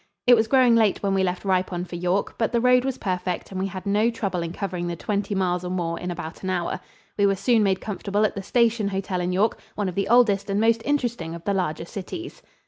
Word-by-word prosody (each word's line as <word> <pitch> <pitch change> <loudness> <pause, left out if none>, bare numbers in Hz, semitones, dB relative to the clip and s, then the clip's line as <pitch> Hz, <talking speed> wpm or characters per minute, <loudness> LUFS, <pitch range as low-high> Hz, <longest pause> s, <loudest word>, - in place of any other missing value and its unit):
It 245 - +8
was 220 -1 +2
growing 255 -1 +5
late 220 -4 +2
when 195 -1 +1
we 195 - +2
left 185 +1 -1
Ripon 185 -2 0
for 175 - -8
York, 180 +3 0
but 225 - +1
the 235 - +2
road 250 +1 +4
was 270 -2 -2
perfect 180 -2 -3
and 190 - -4
we 195 - 0
had 185 0 -7
no 210 +3 +2
trouble 200 -6 -2
in 165 0 -4
covering 180 -2 -4
the 175 - -3
twenty 200 +3 -2
miles 180 -2 0
or 180 - -4
more 170 -2 -2
in 180 - -4
about 160 -2 -6
an 185 - -3
hour. 175 -2 -1 0.4
We 200 - +5
were 195 - +2
soon 220 +4 +2
made 190 -2 +1
comfortable 205 0 -1
at - - 0
the 195 - -5
Station 230 0 +2
Hotel 190 -2 -2
in 180 +1 -1
York, 200 +5 +1 0.2
one 205 -2 -1
of 185 - -3
the 195 +2 -1
oldest 220 -5 +4
and 200 +1 +1
most 225 +1 +3
interesting 240 - -1
of 170 - -10
the 200 - 0
larger 170 -4 -1
cities. 335 - -7
195 Hz, 250 wpm, -24 LUFS, 180-220 Hz, 0.4 s, It